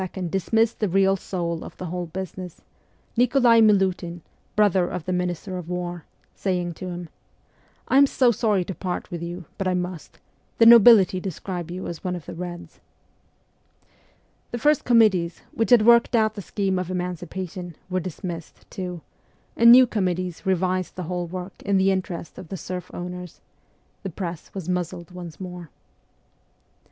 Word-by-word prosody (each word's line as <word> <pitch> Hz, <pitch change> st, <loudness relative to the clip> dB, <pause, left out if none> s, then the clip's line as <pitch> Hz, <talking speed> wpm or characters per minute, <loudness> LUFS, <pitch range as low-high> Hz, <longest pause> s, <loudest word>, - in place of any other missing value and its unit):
dismissed 225 Hz, +5 st, +1 dB
the 210 Hz, -, 0 dB
real 195 Hz, +1 st, +3 dB
soul 170 Hz, -3 st, -4 dB
ot -, -, -11 dB
the 185 Hz, -, -6 dB
whole 175 Hz, 0 st, -4 dB
business, 185 Hz, 0 st, -7 dB, 0.5 s
Nikolai 245 Hz, -1 st, +5 dB
Milutin 190 Hz, -5 st, +2 dB, 0.3 s
(brother 195 Hz, -4 st, +3 dB
of 175 Hz, -2 st, -5 dB
the 185 Hz, -, -1 dB
minister 180 Hz, +1 st, -2 dB
of 175 Hz, -1 st, -9 dB
war), 175 Hz, -2 st, -4 dB, 0.3 s
saying 180 Hz, -3 st, -2 dB
to 185 Hz, -, -8 dB
him, 175 Hz, -1 st, -6 dB, 0.8 s
'I 265 Hz, -, +3 dB
am 280 Hz, -, +7 dB
so 255 Hz, -2 st, +3 dB
sorry 210 Hz, -5 st, +1 dB
to 190 Hz, -, -5 dB
part 180 Hz, +2 st, -5 dB
with 170 Hz, -1 st, -5 dB
you, 175 Hz, +1 st, -6 dB
but 195 Hz, -, -1 dB
I 185 Hz, -, +1 dB
must: 180 Hz, -2 st, -5 dB, 0.4 s
the 230 Hz, -, +6 dB
nobility 225 Hz, -5 st, +8 dB
describe 180 Hz, -1 st, -5 dB
you 180 Hz, +2 st, -5 dB
as 170 Hz, -, -6 dB
one 180 Hz, -1 st, -2 dB
of 170 Hz, -4 st, -8 dB
the -, -, -7 dB
Reds.' 175 Hz, 0 st, -8 dB, 1.7 s
The 240 Hz, -, -4 dB
first 295 Hz, +4 st, +2 dB
committees, 205 Hz, -8 st, +3 dB
which 225 Hz, -, -1 dB
had 240 Hz, -4 st, +6 dB
worked 235 Hz, +1 st, +5 dB
out 220 Hz, -1 st, +3 dB
the 205 Hz, -, -7 dB
scheme 190 Hz, -1 st, -1 dB
of 185 Hz, -1 st, -4 dB
emancipation, 180 Hz, 0 st, -5 dB
were 185 Hz, 0 st, -1 dB
dismissed, 175 Hz, -2 st, -7 dB
too, 180 Hz, -3 st, -5 dB, 0.5 s
and 235 Hz, 0 st, +7 dB
new 255 Hz, +1 st, +9 dB
committees 185 Hz, -4 st, -2 dB
revised 185 Hz, 0 st, 0 dB
the 185 Hz, -, -5 dB
whole 175 Hz, +1 st, -3 dB
work 180 Hz, +2 st, -7 dB
in 200 Hz, -1 st, +2 dB
the 190 Hz, +1 st, +3 dB
interest 185 Hz, -3 st, -4 dB
of 185 Hz, -, -9 dB
the 190 Hz, -, -6 dB
serf 180 Hz, +2 st, -6 dB
owners; 180 Hz, -1 st, -7 dB, 0.6 s
the 195 Hz, -, -4 dB
press 170 Hz, -2 st, -6 dB
was 185 Hz, -4 st, -5 dB
muzzled 180 Hz, -1 st, -3 dB
once 175 Hz, -3 st, -9 dB
more. 180 Hz, -3 st, -8 dB
185 Hz, 165 wpm, -24 LUFS, 175-200 Hz, 1.7 s, new